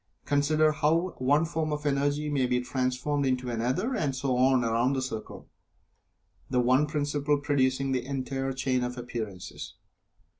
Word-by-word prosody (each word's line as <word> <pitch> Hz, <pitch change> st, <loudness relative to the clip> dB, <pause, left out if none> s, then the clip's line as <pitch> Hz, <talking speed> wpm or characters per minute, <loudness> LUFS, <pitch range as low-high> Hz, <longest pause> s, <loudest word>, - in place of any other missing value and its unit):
Consider 155 Hz, +2 st, +3 dB
how 160 Hz, +4 st, +1 dB
one 145 Hz, +5 st, +3 dB
form 160 Hz, -1 st, -2 dB
of 150 Hz, 0 st, -3 dB
Energy 145 Hz, +1 st, +1 dB
may 140 Hz, -4 st, +1 dB
be 125 Hz, 0 st, +1 dB
transformed 130 Hz, +3 st, -1 dB
into 130 Hz, -2 st, 0 dB
another, 130 Hz, -, -1 dB
and 145 Hz, -, -1 dB
so 130 Hz, -1 st, 0 dB
on 130 Hz, 0 st, +4 dB
around 115 Hz, +3 st, +1 dB
the 135 Hz, -, -1 dB
circle, 110 Hz, -4 st, -6 dB, 1.0 s
the 125 Hz, -, +1 dB
one 130 Hz, +4 st, +3 dB
principle 145 Hz, -1 st, 0 dB
producing 135 Hz, -1 st, +1 dB
the 130 Hz, -1 st, 0 dB
entire 135 Hz, 0 st, -3 dB
chain 130 Hz, -1 st, 0 dB
of 125 Hz, +1 st, -4 dB
appearances. 115 Hz, -6 st, -6 dB
135 Hz, 150 wpm, -28 LUFS, 125-145 Hz, 1.0 s, on